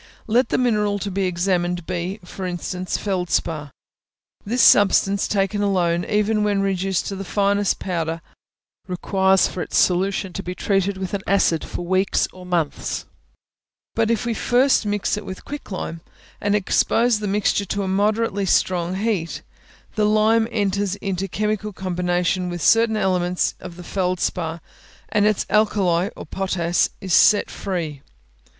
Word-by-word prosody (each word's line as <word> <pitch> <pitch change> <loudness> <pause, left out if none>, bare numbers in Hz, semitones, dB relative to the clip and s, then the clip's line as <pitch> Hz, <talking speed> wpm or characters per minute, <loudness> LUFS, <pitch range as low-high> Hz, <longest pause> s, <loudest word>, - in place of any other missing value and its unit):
Let 240 +4 +2
the - - +1
mineral 210 -5 +1
to 200 0 -4
be 195 +1 0
examined 175 -1 0
be, 180 +3 -3
for 185 +1 -6
instance, 180 +1 -3
feldspar; 175 -6 -1 0.7
this 235 +4 +1
substance, 200 0 +5
taken 200 0 0
alone, 180 -4 +1
even 210 0 +1
when 205 -1 +1
reduced 195 -1 0
to 200 - -4
the 195 - -5
finest 200 +1 +1
powder, 165 -3 -3 0.7
requires 190 +1 +2
for 180 - -5
its - - -2
solution 190 +1 +1
to 195 - -4
be 180 -1 -6
treated 195 0 0
with 190 0 -5
an 200 - -1
acid 190 -5 +2
for - - -5
weeks 185 +2 +1
or 185 -1 -12
months; 170 -5 -2 0.9
but 225 -1 +1
if 230 -1 0
we 235 - 0
first 245 0 +2
mix 205 0 0
it 210 - -5
with 185 - -8
quick 290 0 -7
lime, 165 -4 -5 0.4
and 205 0 +1
expose 225 +3 +2
the 210 - -3
mixture 200 0 +1
to 200 +2 -2
a - - -3
moderately 205 +1 0
strong 180 0 +1
heat, 175 - -2 0.5
the 215 -1 +1
lime 215 +1 +3
enters 200 -3 0
into 195 -1 -3
chemical 210 +1 -2
combination 180 -1 -1
with 175 -3 -4
certain 225 +2 +4
elements 180 -2 +1
of 170 - -9
the 180 - -10
feldspar, 175 -3 -2 0.5
and 210 0 +3
its 215 -2 +1
alkali 195 -4 +2 0.2
(potass) 175 -3 0
is 190 -3 -2
set 210 +3 +5
free. 165 -7 -4
195 Hz, 150 wpm, -22 LUFS, 180-210 Hz, 0.9 s, substance